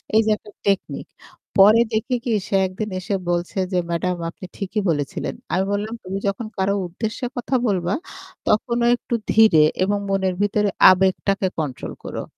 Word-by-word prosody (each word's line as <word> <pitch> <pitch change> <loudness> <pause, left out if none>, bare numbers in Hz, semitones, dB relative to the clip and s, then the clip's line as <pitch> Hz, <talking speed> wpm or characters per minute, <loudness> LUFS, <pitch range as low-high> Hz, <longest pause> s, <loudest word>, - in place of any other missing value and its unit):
এই 220 - +7
যে - - +1
একটা 210 - -15
টেকনিক 200 -1 -1 0.5
পরে 210 +4 +7
দেখি 220 +4 0
কি 240 - 0 0.2
সে - - -1
একদিন 210 +3 -5
এসে 195 +2 -2
বলছে 175 +2 -2
যে 180 - +1
"ম্যাডাম 180 +2 -1
আপনি 185 - -10
ঠিকই 205 +1 -2
বলেছিলেন।" 145 -3 -2 0.2
আমি 190 +2 +2
বললাম 210 +2 -2
"তুমি 190 +1 -4
যখন 200 +3 -2
কারো 195 +1 +1
উদ্দেশ্যে 220 +8 -4
কথা 245 +2 -1
বলবা 180 -2 0 0.5
তখনও 235 +2 +1
একটু 240 - -4 0.2
ধীরে 215 -9 +6 0.2
এবং 205 +2 +1
মনের 190 -1 +1
ভিতরে 205 0 +2 0.2
আবেগটাকে 190 +1 +1
control 140 -5 -4
করো। - - -5
195 Hz, 160 wpm, -22 LUFS, 185-215 Hz, 0.5 s, এই